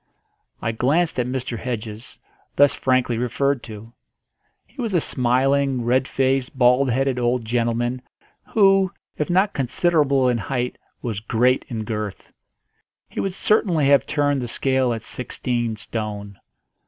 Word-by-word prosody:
I 115 - 0
glanced 145 +7 +1
at 125 - 0
Mr. 125 -3 -3
Hedges, 115 -1 -6 0.4
thus 145 0 +5
frankly 130 -3 +1
referred 135 +2 0
to. 110 +1 -10 0.7
He 270 - -9
was 225 -6 -1
a - - +5
smiling, 135 0 +1
red 130 +2 +2
faced, 130 0 0
bald 125 +1 +4
headed 130 +1 0
old 120 -1 0
gentleman, 120 +2 -1 0.5
who, 195 -3 +5 0.3
if 150 - -1
not 190 +3 +2
considerable 140 0 +2
in 120 -2 +1
height, 125 +2 -3 0.2
was 110 -5 -3
great 120 +4 +1
in 115 -3 -3
girth. 105 -2 -5 0.8
He - - -6
would 195 - -1
certainly 180 -9 +2
have 140 -1 +4
turned 145 -2 +1
the 120 - -3
scale 130 +1 +1
at 115 -1 -4
sixteen 120 -2 -3
stone. 105 -2 -5
125 Hz, 140 wpm, -22 LUFS, 120-140 Hz, 0.8 s, thus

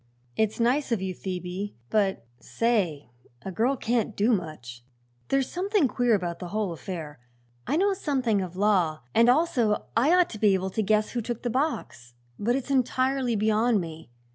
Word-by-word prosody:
"It's 220 +1 0
nice 250 +4 +1
of 230 - +2
you, 190 0 -3
Phoebe; 185 +2 -5 0.2
but, 195 - +1
say 185 - -1 0.3
a 190 - -5
girl 240 +8 +1
can't 230 -2 -1
do 220 +4 +3
much. 150 - -5 0.4
There's 270 -1 +1
something 385 -3 +1
queer 245 -2 +2
about 175 -3 -3
the 180 - -6
whole 205 0 -2
affair. 160 -4 -7 0.5
I - - +1
know 395 +3 +3
something 260 - 0
of 180 -1 -6
law 185 -6 +2
and 230 +1 +5
also 245 -7 +2
I 260 +8 +4
ought 360 -1 +3
to 215 - -7
be 205 -2 +4
able 190 0 -2
to 220 - -1
guess 215 +1 +1
who 240 - -2
took 235 +1 -5
the 240 - -1
box; 225 - -3 0.2
but 235 +4 +1
it's 270 +1 -3
entirely 260 -1 +1
beyond 220 +2 +2
me. 160 -5 -7
215 Hz, 175 wpm, -26 LUFS, 185-250 Hz, 0.5 s, and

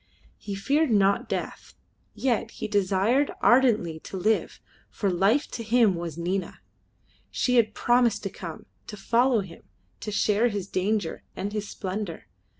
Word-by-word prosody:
He 200 - -5
feared 285 +10 +1
not 200 -2 +2
death, - - -5 0.4
yet 235 -4 0
he - - -3
desired 205 +7 +2
ardently 225 -11 +3
to 190 - -8
live, 215 +4 0 0.3
for 200 -3 -1
life 200 +11 +2
to 230 - -5
him 225 -2 +4
was 170 -2 -5
Nina. 180 +3 -3 0.7
She 250 -1 +1
had 220 -2 +3
promised 240 -2 +2
to 195 - -3
come, 165 -4 -8 0.2
to 210 - -8
follow 235 +3 +2
him, 185 -4 -11 0.4
to 210 - -5
share 210 +2 +2
his 205 -5 -3
danger 195 -2 -1
and 205 +2 -4
his 210 -1 -3
splendour. 190 -2 -5
210 Hz, 150 wpm, -26 LUFS, 190-235 Hz, 0.7 s, him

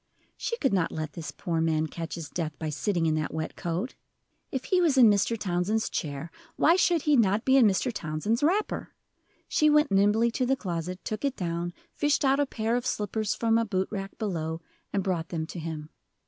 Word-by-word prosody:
She 465 - -3
could 270 - +1
not 180 -4 +1
let 155 -1 -4
this 165 -3 -6
poor 165 -2 -2
man 160 -1 +1
catch 165 +1 -5
his 165 -3 -6
death, 155 -3 -4
by 160 - -3
sitting 170 +3 0
in 160 - +2
that 155 0 -1
wet 160 0 -4
coat. 175 +7 -3 0.6
If 265 -2 -2
he 370 -2 +2
was 310 -6 +3
in 235 -4 +8
Mr. 205 +3 +1
Townsend's 200 +3 0
chair, 150 +1 -4 0.2
why 330 - +5
should 345 -4 +3
he 300 -1 +4
not 215 -3 +3
be 265 - +5
in 255 -5 +7
Mr. 210 +5 +1
Townsend's 170 +6 -1
wrapper? 375 +8 0 0.5
She 305 - +3
went 300 0 +4
nimbly 205 +4 +4
to 255 +2 0
the 270 - +3
closet, 180 -5 -4
took 215 +3 -4
it 275 -2 0
down, 170 -1 -2 0.2
fished 290 -1 +1
out 270 +1 +3
a 285 - +2
pair 225 -1 -1
of 245 +1 -1
slippers 210 -1 -1
from 225 0 +2
a - - +2
boot 190 -3 -1
rack 195 -2 -5
below, 165 -6 -2 0.3
and 200 -2 0
brought 175 -4 -1
them 160 -2 -2
to 170 - -7
him. 155 -1 -6
200 Hz, 210 wpm, -28 LUFS, 165-245 Hz, 0.6 s, in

